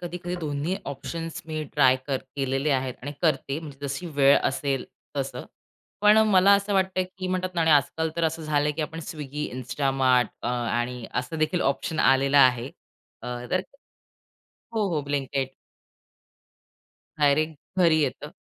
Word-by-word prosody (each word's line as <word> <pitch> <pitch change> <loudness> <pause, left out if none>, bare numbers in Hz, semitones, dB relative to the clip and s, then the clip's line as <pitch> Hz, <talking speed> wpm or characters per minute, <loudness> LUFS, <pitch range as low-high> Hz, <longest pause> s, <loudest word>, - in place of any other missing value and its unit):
कधी-कधी 175 0 -5
दोन्ही 150 +4 -2
ऑप्शन्स 165 +4 -5
मी 155 -1 -3
ट्राय 130 0 +5
कर 140 - 0 0.2
केलेले 135 +2 0
आहेत 130 -2 0
आणि 145 +2 -5
करते 140 -2 +1
म्हणजे 145 -2 -8
जशी 140 +6 -4
वेळ 140 0 +6
असेल 135 -1 -1 0.3
तसं. - - -3 0.6
पण 210 +1 +6
मला 190 +1 +6
असं 200 +1 0
वाटतंय 190 -1 +1
की 185 - -3
म्हणतात 185 0 -2
ना 170 - 0
आणि 160 - +3
आजकाल 155 +2 +2
तर 170 - +1
असं 160 0 -1
झालंय 150 -1 +1
की 155 - -2
आपण 160 +2 -5
स्विगी, 150 -2 -5
इन्स्टामार्ट 130 0 +1
अ, - - -1
आणि 120 0 -2
असं 125 +6 -2
देखील 155 +3 +1
ऑप्शन 155 +3 -4
आलेलं 135 +1 +4
आहे. 125 -1 +4 0.5
अ, - - -7 0.2
तर 185 - +2 1.1
हो, 215 -3 +1
हो, 150 - 0
ब्लिंकीट. 140 -1 -2 1.7
डायरेक्ट 150 +2 +3 0.2
घरी 165 -3 +5
येतं. 145 +1 -2
145 Hz, 150 wpm, -26 LUFS, 135-165 Hz, 1.7 s, वेळ